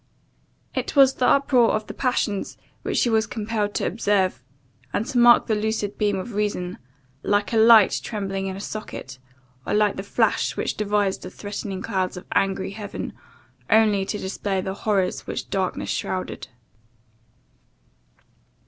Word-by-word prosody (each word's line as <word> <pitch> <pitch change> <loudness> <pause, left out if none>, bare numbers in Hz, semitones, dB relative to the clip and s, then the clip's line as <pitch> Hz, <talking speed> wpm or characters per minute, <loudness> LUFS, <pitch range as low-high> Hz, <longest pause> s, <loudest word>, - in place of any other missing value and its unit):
It - - -3
was 270 -1 +7
the 250 - +1
uproar 255 -4 +4
of 215 0 -2
the - - -8
passions 225 -6 -1 0.2
which - - -2
she 240 - +3
was 220 0 +2
compelled 215 -2 -2
to - - 0
observe; 195 - +1 0.5
and 210 - -1
to 255 -1 0
mark 240 0 +7
the 220 - 0
lucid 210 -1 -2
beam 205 -2 +1
of 200 +5 -6
reason, 200 -3 -2 0.4
like 205 +4 0
a - - +3
light 220 -2 +7
trembling 195 -3 -3
in 190 - -4
a - - -7
socket, 200 -11 -7 0.4
or - - -1
like 210 -1 +2
the - - -2
flash 200 - 0
which - - -1
divides 205 -2 0
the - - -8
threatening 200 -2 -6
clouds 190 -3 -2
of 180 - -9
angry 195 0 0
heaven 205 0 -6 0.6
only 215 -3 +4
to 210 - -3
display 195 0 -2
the 190 +1 -3
horrors 195 -2 -1
which - - -5
darkness 190 -2 -1
shrouded. 185 -7 -3
205 Hz, 155 wpm, -23 LUFS, 195-220 Hz, 0.6 s, was